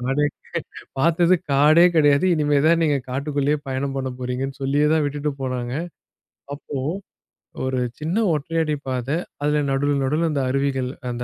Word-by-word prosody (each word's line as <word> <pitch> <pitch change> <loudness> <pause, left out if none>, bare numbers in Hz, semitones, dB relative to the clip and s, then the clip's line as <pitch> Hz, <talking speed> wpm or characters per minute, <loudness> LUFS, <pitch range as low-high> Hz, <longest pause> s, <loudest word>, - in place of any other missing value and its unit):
காடே 135 +4 0 0.2
கிடை - - -4 0.4
பார்த்தது 170 +4 +4 0.2
காடே 150 +5 +6
கிடையாது, 145 +1 +4
இனிமேல் 145 -2 +2
தான் 165 +1 +4
நீங்கள் 145 -4 0
காட்டுக்குள்ளேயே 145 +2 0
பயணம் 135 +1 -2
பண்ணப்போகிறீர்கள் 130 0 -3
என்று 135 +1 -9
சொல்லியே 145 +2 +2
தான் 160 -1 +3
விட்டுவிட்டுப் 145 0 -3
போனார்கள். 130 +4 -3 0.7
அப்பொழுது 145 0 -4 0.7
ஒரு 130 -1 -1 0.2
சின்ன 160 +4 -2 0.2
ஒற்றையடிப் 155 -1 -2
பாதை. 130 +4 -1 0.3
அதில் 150 -1 +1
நடு 145 +1 +1
நடுவில் 155 +5 +1
அந்த 140 - 0
அருவிகள். 135 -2 0 0.2
அந்த 120 0 -4
140 Hz, 145 wpm, -22 LUFS, 135-150 Hz, 0.7 s, காடே